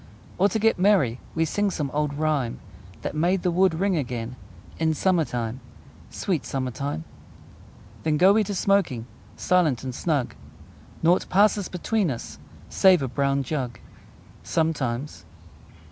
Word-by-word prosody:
Or, 200 Hz, +2 st, +4 dB
to 210 Hz, -, -1 dB
get 225 Hz, -2 st, +2 dB
merry, 180 Hz, -, +3 dB, 0.2 s
We 165 Hz, 0 st, +2 dB
sing 205 Hz, +6 st, 0 dB
some 150 Hz, -7 st, -3 dB
old 150 Hz, -1 st, -1 dB
rhyme 150 Hz, -6 st, 0 dB, 0.5 s
That -, -, -3 dB
made 175 Hz, +4 st, +1 dB
the 180 Hz, -, +2 dB
wood 185 Hz, -1 st, +3 dB
ring 190 Hz, +2 st, +1 dB
again 125 Hz, -3 st, -4 dB, 0.4 s
In 160 Hz, -1 st, +1 dB
summer 180 Hz, -1 st, +2 dB
time 120 Hz, -1 st, -4 dB, 0.5 s
Sweet 175 Hz, -8 st, -2 dB
summer 130 Hz, -2 st, -3 dB
time! 140 Hz, -, -4 dB, 1.0 s
Then 155 Hz, -1 st, +1 dB
go 190 Hz, +5 st, +6 dB
we 215 Hz, +1 st, +3 dB
smoking, 195 Hz, -, 0 dB, 0.3 s
Silent 160 Hz, -10 st, +2 dB
and 130 Hz, -1 st, -4 dB
snug: 145 Hz, -2 st, -1 dB, 0.7 s
Naught 175 Hz, +3 st, +3 dB
passes 205 Hz, 0 st, +3 dB
between 190 Hz, +1 st, 0 dB
us, 120 Hz, -4 st, -6 dB, 0.3 s
Save 185 Hz, -6 st, +4 dB
a -, -, -1 dB
brown 140 Hz, +2 st, 0 dB
jug 130 Hz, -3 st, -3 dB, 0.6 s
Sometimes! 150 Hz, -, -2 dB
155 Hz, 140 wpm, -25 LUFS, 130-185 Hz, 1.0 s, go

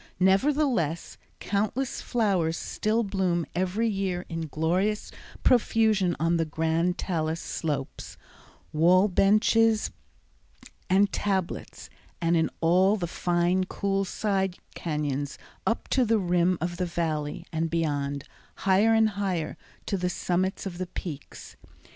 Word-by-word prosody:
Nevertheless, 195 Hz, -, +1 dB, 0.2 s
countless 215 Hz, +6 st, -1 dB
flowers 190 Hz, -8 st, +1 dB
still 220 Hz, +2 st, 0 dB
bloom 185 Hz, -4 st, 0 dB
every 185 Hz, +6 st, 0 dB
year 195 Hz, -4 st, -2 dB
in 165 Hz, -1 st, -4 dB
glorious 180 Hz, +8 st, 0 dB, 0.3 s
profusion 220 Hz, -7 st, +3 dB
on 165 Hz, +2 st, +2 dB
the 165 Hz, -, +2 dB
grand 160 Hz, +3 st, 0 dB
talus 160 Hz, -3 st, -1 dB
slopes, 145 Hz, -6 st, -4 dB, 0.6 s
wall 180 Hz, +5 st, +5 dB
benches 215 Hz, +3 st, +3 dB, 1.0 s
and 195 Hz, +2 st, +4 dB
tablets, 190 Hz, -3 st, -2 dB, 0.3 s
and 170 Hz, 0 st, +2 dB
in 160 Hz, -1 st, +2 dB
all 185 Hz, +5 st, +4 dB
the 185 Hz, -5 st, -2 dB
fine, 175 Hz, +2 st, +1 dB
cool 195 Hz, +1 st, -1 dB
side 190 Hz, -1 st, -1 dB, 0.2 s
cañons 145 Hz, -3 st, -2 dB, 0.3 s
up 225 Hz, -, 0 dB
to 260 Hz, -, +3 dB
the 225 Hz, -1 st, +3 dB
rim 180 Hz, -1 st, +2 dB
of 175 Hz, +1 st, -3 dB
the 180 Hz, 0 st, -1 dB
Valley, 160 Hz, -1 st, -2 dB
and 160 Hz, +1 st, 0 dB
beyond, 145 Hz, -4 st, -1 dB, 0.4 s
higher 200 Hz, +4 st, +4 dB
and 220 Hz, -1 st, +4 dB
higher, 185 Hz, -6 st, -2 dB, 0.3 s
to 200 Hz, -, -1 dB
the 180 Hz, 0 st, -1 dB
summits 185 Hz, +2 st, -1 dB
of 180 Hz, -2 st, -5 dB
the 185 Hz, -, -3 dB
peaks. 155 Hz, -5 st, -8 dB
180 Hz, 125 wpm, -27 LUFS, 165-200 Hz, 1.0 s, wall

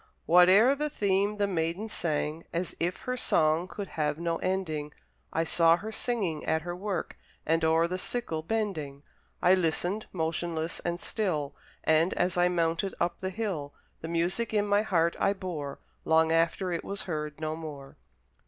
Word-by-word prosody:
Whate'er 185 Hz, +9 st, +7 dB
the 300 Hz, +2 st, -2 dB
theme, 200 Hz, -4 st, +1 dB
the 205 Hz, -, +2 dB
Maiden 175 Hz, +2 st, -1 dB
sang 160 Hz, -4 st, -2 dB
As 170 Hz, +1 st, -3 dB
if 175 Hz, +2 st, -1 dB
her 250 Hz, -1 st, -2 dB
song 160 Hz, -7 st, +2 dB
could 200 Hz, +1 st, -6 dB
have 150 Hz, -1 st, -1 dB
no 170 Hz, 0 st, -1 dB
ending; 160 Hz, -6 st, -2 dB, 0.4 s
I 165 Hz, -, +1 dB
saw 165 Hz, 0 st, +4 dB
her 215 Hz, +4 st, -6 dB
singing 200 Hz, -11 st, -1 dB
at 160 Hz, 0 st, +1 dB
her 175 Hz, 0 st, -4 dB
work, 195 Hz, 0 st, -4 dB, 0.3 s
And 165 Hz, +1 st, +2 dB
o'er 160 Hz, +1 st, +4 dB
the 185 Hz, +2 st, -3 dB
sickle 185 Hz, -8 st, -3 dB
bending; 160 Hz, -8 st, -3 dB, 0.4 s
I 180 Hz, -, +7 dB
listened, 185 Hz, +3 st, 0 dB
motionless 165 Hz, -1 st, -2 dB
and 175 Hz, 0 st, -2 dB
still; 160 Hz, -12 st, -2 dB, 0.3 s
And, 160 Hz, +3 st, +3 dB
as 175 Hz, 0 st, +1 dB
I 175 Hz, 0 st, +4 dB
mounted 170 Hz, +2 st, 0 dB
up 170 Hz, 0 st, 0 dB
the 190 Hz, -, -2 dB
hill 185 Hz, -9 st, -3 dB, 0.3 s
The 160 Hz, -, -5 dB
music 175 Hz, +7 st, -1 dB
in 205 Hz, -1 st, +3 dB
my 205 Hz, 0 st, +3 dB
heart 170 Hz, -5 st, +1 dB
I 200 Hz, -, +3 dB
bore, 170 Hz, -8 st, -5 dB, 0.3 s
Long 160 Hz, 0 st, +4 dB
after 165 Hz, +3 st, +1 dB
it 170 Hz, -, -2 dB
was 200 Hz, 0 st, -4 dB
heard 150 Hz, -3 st, -4 dB
no 155 Hz, 0 st, -2 dB
more. 150 Hz, -4 st, -8 dB
170 Hz, 170 wpm, -29 LUFS, 160-195 Hz, 0.4 s, Whate'er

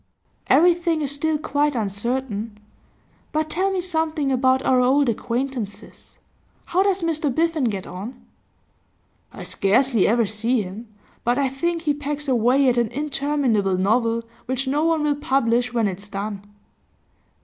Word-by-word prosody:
'Everything 340 Hz, 0 st, +4 dB
is 280 Hz, -, -1 dB
still 305 Hz, +2 st, 0 dB
quite 295 Hz, -1 st, 0 dB
uncertain. 220 Hz, 0 st, -3 dB, 0.7 s
But 310 Hz, 0 st, -1 dB
tell 385 Hz, +3 st, +1 dB
me 380 Hz, -1 st, -1 dB
something 320 Hz, -5 st, -1 dB
about 260 Hz, 0 st, +2 dB
our 255 Hz, -1 st, +3 dB
old 270 Hz, +3 st, +3 dB
acquaintances. 235 Hz, -1 st, -4 dB, 0.5 s
How 365 Hz, -, +1 dB
does 390 Hz, -2 st, +1 dB
Mr 315 Hz, -3 st, 0 dB
Biffen 325 Hz, 0 st, +1 dB
get 195 Hz, -3 st, -4 dB
on?' 215 Hz, +8 st, -8 dB, 1.1 s
'I -, -, -9 dB
scarcely 230 Hz, +2 st, +2 dB
ever 230 Hz, +1 st, +3 dB
see 220 Hz, +3 st, 0 dB
him, 200 Hz, +5 st, -9 dB, 0.4 s
but 240 Hz, +2 st, +1 dB
I 275 Hz, -2 st, +2 dB
think 335 Hz, +5 st, -2 dB
he 295 Hz, -3 st, +2 dB
pegs 295 Hz, 0 st, -4 dB
away 255 Hz, +2 st, +3 dB
at 245 Hz, -1 st, +3 dB
an 235 Hz, -1 st, +2 dB
interminable 275 Hz, -7 st, 0 dB
novel, 230 Hz, +4 st, +1 dB, 0.2 s
which 260 Hz, +1 st, -2 dB
no 290 Hz, +3 st, +1 dB
one 325 Hz, -2 st, +2 dB
will 295 Hz, -1 st, +1 dB
publish 245 Hz, -4 st, +1 dB
when 230 Hz, -3 st, +1 dB
it's 200 Hz, +2 st, -6 dB
done. 205 Hz, 0 st, -5 dB
260 Hz, 145 wpm, -22 LUFS, 230-300 Hz, 1.1 s, Everything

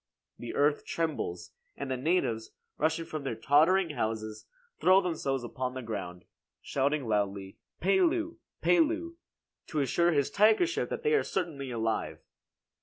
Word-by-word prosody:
The 120 Hz, -, -6 dB
earth 145 Hz, +1 st, +2 dB
trembles, 145 Hz, -, -3 dB, 0.3 s
and 140 Hz, -1 st, -4 dB
the -, -, +1 dB
natives, 125 Hz, -6 st, 0 dB, 0.3 s
rushing 160 Hz, +2 st, +1 dB
from 155 Hz, -3 st, -5 dB
their 135 Hz, -4 st, -2 dB
tottering 160 Hz, -, +3 dB
houses 110 Hz, -4 st, -3 dB, 0.3 s
throw 185 Hz, +1 st, +6 dB
themselves 155 Hz, -8 st, -2 dB
upon 125 Hz, +1 st, -4 dB
the 130 Hz, -, -5 dB
ground, 90 Hz, -6 st, -6 dB, 0.3 s
shouting 140 Hz, -1 st, -1 dB
loudly 100 Hz, -2 st, -1 dB, 0.2 s
"Pelu! 335 Hz, -, +2 dB, 0.3 s
Pelu!" 335 Hz, 0 st, +2 dB, 0.5 s
to 155 Hz, -, -2 dB
assure 170 Hz, +6 st, +2 dB
his 145 Hz, -4 st, +1 dB
tigership 220 Hz, -, +3 dB
that -, -, -4 dB
they 450 Hz, 0 st, +2 dB
are 440 Hz, -, +4 dB
certainly 155 Hz, -8 st, -3 dB
alive. 115 Hz, -2 st, -2 dB
145 Hz, 135 wpm, -30 LUFS, 115-185 Hz, 0.5 s, throw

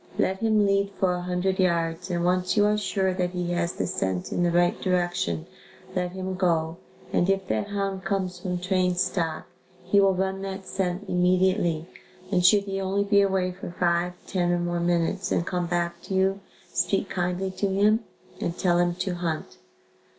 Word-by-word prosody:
Let 190 Hz, 0 st, +1 dB
him 215 Hz, -2 st, +3 dB
lead 200 Hz, 0 st, +1 dB
for 185 Hz, -2 st, +3 dB
a 180 Hz, -, -3 dB
hundred 180 Hz, +2 st, -1 dB
yards 170 Hz, 0 st, +1 dB
and 175 Hz, -1 st, 0 dB
once 180 Hz, +2 st, +1 dB
you 205 Hz, -, +5 dB
are 210 Hz, 0 st, +3 dB
sure 195 Hz, -2 st, 0 dB
that 180 Hz, -1 st, 0 dB
he 175 Hz, -1 st, -2 dB
has 175 Hz, 0 st, 0 dB
the -, -, -2 dB
scent 95 Hz, -, -2 dB
in -, -, 0 dB
the 175 Hz, -, +3 dB
right 175 Hz, +1 st, +2 dB
direction, 175 Hz, -, 0 dB, 0.5 s
let 180 Hz, -1 st, -1 dB
him 190 Hz, 0 st, -4 dB
go 170 Hz, -3 st, 0 dB, 0.4 s
and 175 Hz, -, +2 dB
if 195 Hz, -1 st, +1 dB
that 110 Hz, 0 st, 0 dB
hound 195 Hz, -2 st, -2 dB
comes 185 Hz, -1 st, -2 dB
from 180 Hz, 0 st, -2 dB
trained 180 Hz, 0 st, +1 dB
stock, 175 Hz, -3 st, -1 dB, 0.4 s
he 185 Hz, +3 st, +3 dB
will 195 Hz, -1 st, +4 dB
run 190 Hz, +1 st, -1 dB
that 195 Hz, 0 st, -5 dB
scent 185 Hz, +1 st, -2 dB
immediately 180 Hz, -2 st, +2 dB, 0.5 s
and 180 Hz, -2 st, +2 dB
should 200 Hz, +2 st, +6 dB
he 195 Hz, -1 st, -3 dB
only 195 Hz, +1 st, 0 dB
be 200 Hz, 0 st, +4 dB
away 190 Hz, -2 st, +1 dB
for 180 Hz, 0 st, -8 dB
five, 175 Hz, 0 st, +2 dB
ten 175 Hz, -2 st, 0 dB
or 175 Hz, -, +2 dB
more 175 Hz, 0 st, -1 dB
minutes 175 Hz, +3 st, 0 dB
and 170 Hz, -, +1 dB
come 180 Hz, -1 st, -1 dB
back 170 Hz, 0 st, -1 dB
to 190 Hz, -, -4 dB
you, 190 Hz, +1 st, +2 dB, 0.3 s
speak 195 Hz, 0 st, +1 dB
kindly 180 Hz, +1 st, -2 dB
to 200 Hz, +2 st, -1 dB
him 205 Hz, +3 st, +3 dB, 0.4 s
and 170 Hz, -, -3 dB
tell 175 Hz, -2 st, +2 dB
him 175 Hz, 0 st, +2 dB
to 185 Hz, 0 st, -2 dB
hunt. 170 Hz, -3 st, -4 dB
180 Hz, 190 wpm, -26 LUFS, 175-195 Hz, 0.5 s, should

